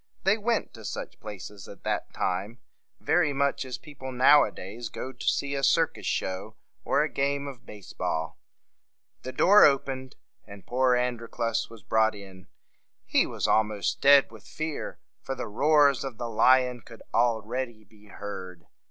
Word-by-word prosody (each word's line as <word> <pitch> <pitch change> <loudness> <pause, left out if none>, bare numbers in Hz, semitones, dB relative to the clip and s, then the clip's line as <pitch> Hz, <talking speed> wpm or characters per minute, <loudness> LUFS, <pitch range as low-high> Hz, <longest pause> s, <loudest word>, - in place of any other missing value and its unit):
They 195 +2 +4
went 225 +1 -1
to 110 - -12
such - - -6
places 105 -1 -9
at - - -13
that - - -2
time 95 +6 -2 0.4
very 160 -4 +2
much 140 0 0
as 130 -1 -5
people 130 -3 -9
now 135 +4 +6
a - - -2
days 110 +5 -8
go 130 - -6
to 125 - -9
see 140 0 +1
a 140 - -1
circus - - +2
show 95 +4 -3 0.3
or - - +2
a - - 0
game 140 +1 -1
of 130 -4 -9
base 105 -3 -11
ball. 80 +1 -3 0.8
The 130 - -6
door 200 +9 +6
opened, 135 -2 +1 0.3
and 100 -2 -13
poor 125 0 +2
Androclus 115 -1 -2
was 115 -3 -13
brought 110 +1 +2
in. 95 -2 -12 0.6
He - - +2
was - - -2
almost 105 -2 +1
dead 140 -2 +6
with 110 -3 -14
fear, 155 -1 -5 0.2
for 135 - -4
the 125 - -5
roars 140 +3 +3
of 135 -5 -6
the 120 -1 -4
lion 125 +2 +3
could 115 0 -14
al 120 -2 +3
read 125 +4 -2
y 110 -2 -19
be 105 0 -21
heard. 95 -4 -8
120 Hz, 170 wpm, -27 LUFS, 105-140 Hz, 0.8 s, now